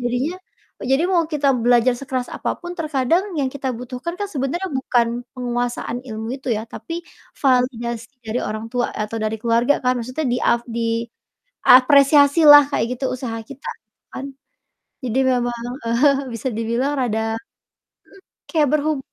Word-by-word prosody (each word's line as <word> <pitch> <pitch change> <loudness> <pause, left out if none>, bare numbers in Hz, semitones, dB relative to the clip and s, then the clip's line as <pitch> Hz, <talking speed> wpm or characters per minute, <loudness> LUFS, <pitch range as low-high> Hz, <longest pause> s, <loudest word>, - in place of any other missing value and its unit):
jadinya 245 +7 -1 0.5
jadi 270 +4 +2
mau 360 -2 +3
kita 290 -2 +1 0.2
belajar 245 0 +4
sekeras 260 -2 -3
apa - - -3
pun 350 -1 -6
terkadang 310 +3 +1
yang 275 - +1
kita 270 -2 -3
butuhkan 250 +7 -5
kan 410 - -2
sebenarnya 310 +3 -2
bukan 250 -3 +1 0.3
penguasaan 245 -1 -2
ilmu 220 +1 -5
itu 265 -1 -8
ya, 215 - -3
tapi 230 +8 -7 0.4
validasi 240 -3 0
dari 220 +2 -2
orang 215 +1 -4
tua 245 -1 0
atau 215 +1 -4
dari 215 0 -1
keluarga 235 +4 +3
kan 250 - +4
maksudnya 255 +7 -4
di 245 - +1
ap 235 - +3 0.8
diapresiasilah 290 - +6
kayak 220 - +1
gitu 270 - -3
usaha 245 -3 -5
kita 275 - -10 0.5
kan? 270 - -5 0.8
Jadi 250 +1 -1
memang, 240 -1 -1 0.3
eee, 270 +3 +2
bisa 230 +3 -3
dibilang 235 +5 0
rada 225 -2 -1
mhm, 225 - -10 1.0
kayak 310 -4 +3
berhub 305 -1 +1
255 Hz, 145 wpm, -21 LUFS, 235-285 Hz, 1.0 s, diapresiasilah